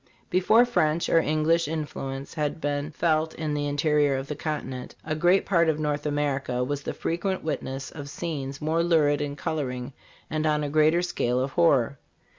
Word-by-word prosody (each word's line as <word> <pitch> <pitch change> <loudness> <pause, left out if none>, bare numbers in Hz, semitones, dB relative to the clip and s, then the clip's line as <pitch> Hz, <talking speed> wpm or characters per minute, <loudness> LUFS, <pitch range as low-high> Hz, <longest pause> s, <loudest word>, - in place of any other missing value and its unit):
Before 215 +6 +5
French 165 -9 +1
or 165 - +5
English 155 +1 +2
influence 140 -3 -5
had 150 -1 -2
been 145 0 -2
felt 160 0 0
in 155 -2 -2
the 145 0 -1
interior 145 -1 +2
of 135 0 -3
the 150 - -3
continent, 140 -4 -5
a 155 - -1
great 175 +5 +3
part 170 -4 +3
of 155 -1 0
North 150 -1 -1
America 140 -4 -1
was 145 +2 -2
the - - -4
frequent 185 +3 -2
witness 135 -4 -4
of 145 -2 -8
scenes 140 -4 -4
more 160 +2 +1
lurid 155 -4 +3
in 145 -1 -3
coloring 130 -4 -3 0.3
and 155 0 -1
on 150 -1 +1
a 145 - -2
larger 155 +3 +3
scale 125 -8 0
of 135 +1 -1
horror. 140 -6 +3
150 Hz, 180 wpm, -26 LUFS, 140-160 Hz, 0.3 s, Before